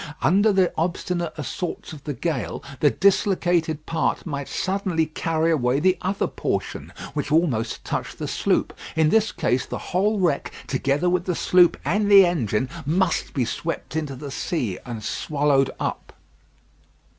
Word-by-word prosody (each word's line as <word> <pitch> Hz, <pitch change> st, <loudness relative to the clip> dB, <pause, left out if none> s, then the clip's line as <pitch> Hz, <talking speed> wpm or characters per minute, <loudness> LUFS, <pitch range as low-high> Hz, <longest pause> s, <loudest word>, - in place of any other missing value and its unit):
Under 205 Hz, +4 st, +4 dB
the 190 Hz, -2 st, +2 dB
obstinate 175 Hz, 0 st, -1 dB
assaults 160 Hz, +3 st, -5 dB
of 145 Hz, -2 st, -11 dB
the 145 Hz, -3 st, -3 dB
gale, 125 Hz, -, -3 dB, 0.2 s
the 145 Hz, -, +5 dB
dislocated 175 Hz, -4 st, +2 dB
part 165 Hz, -1 st, -1 dB
might 140 Hz, -4 st, -4 dB
suddenly 185 Hz, -4 st, 0 dB
carry 160 Hz, +1 st, 0 dB
away 130 Hz, -3 st, +2 dB
the 185 Hz, +4 st, +3 dB
other 195 Hz, +2 st, 0 dB
portion, -, -, -3 dB, 0.2 s
which 145 Hz, 0 st, -3 dB
almost 150 Hz, -9 st, +1 dB
touched -, -, -3 dB
the -, -, -4 dB
sloop. -, -, 0 dB, 0.2 s
In 160 Hz, -1 st, +4 dB
this 220 Hz, +3 st, +3 dB
case, 125 Hz, +1 st, 0 dB
the -, -, -4 dB, 0.2 s
whole 205 Hz, +4 st, +2 dB
wreck, 170 Hz, -7 st, 0 dB
together 140 Hz, +5 st, 0 dB
with 180 Hz, 0 st, +1 dB
the 180 Hz, -, -1 dB
sloop 180 Hz, 0 st, +4 dB
and 205 Hz, +3 st, +1 dB
the 200 Hz, -2 st, +9 dB
engine, 130 Hz, -, 0 dB, 0.2 s
must 170 Hz, +5 st, 0 dB
be 130 Hz, -4 st, +1 dB
swept 165 Hz, +5 st, -4 dB
into 150 Hz, -4 st, -2 dB
the 140 Hz, +2 st, -7 dB
sea 125 Hz, -, -2 dB
and 115 Hz, -3 st, -6 dB
swallowed 140 Hz, +1 st, +1 dB
up. -, -, -4 dB
160 Hz, 155 wpm, -23 LUFS, 140-180 Hz, 0.2 s, the